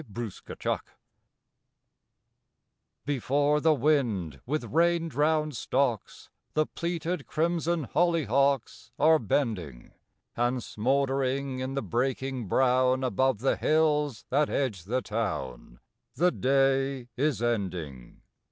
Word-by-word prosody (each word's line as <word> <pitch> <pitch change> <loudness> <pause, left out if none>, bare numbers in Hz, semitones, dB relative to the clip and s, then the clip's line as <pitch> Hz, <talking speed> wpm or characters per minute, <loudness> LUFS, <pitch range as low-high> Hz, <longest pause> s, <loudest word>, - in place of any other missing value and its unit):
CLEARING 110 -1 -4 2.3
Before 145 +2 +1
the 160 0 +4
wind, 115 - 0
with 150 +4 -1
rain 170 +1 +2
drowned 150 +1 +1
stocks, 120 -4 -2 0.2
The 155 0 +3
pleated 170 -2 -3
crimson 170 0 0
hollyhocks 140 -6 +1
Are 160 0 +5
bending; 95 - -2 0.4
And, 120 +1 0
smouldering 135 +2 0
in 130 +1 -3
the 140 - -1
breaking 130 -1 -2
brown, 130 +3 +2
Above 130 -1 +1
the 135 - +2
hills 150 -5 +1
that 145 +3 +2
edge 105 -11 -2
the 125 +5 -1
town, 80 - -4 0.4
The 180 +1 +3
day 135 -2 +1
is 135 -4 0
ending. 90 - -3
135 Hz, 100 wpm, -28 LUFS, 115-150 Hz, 2.3 s, Are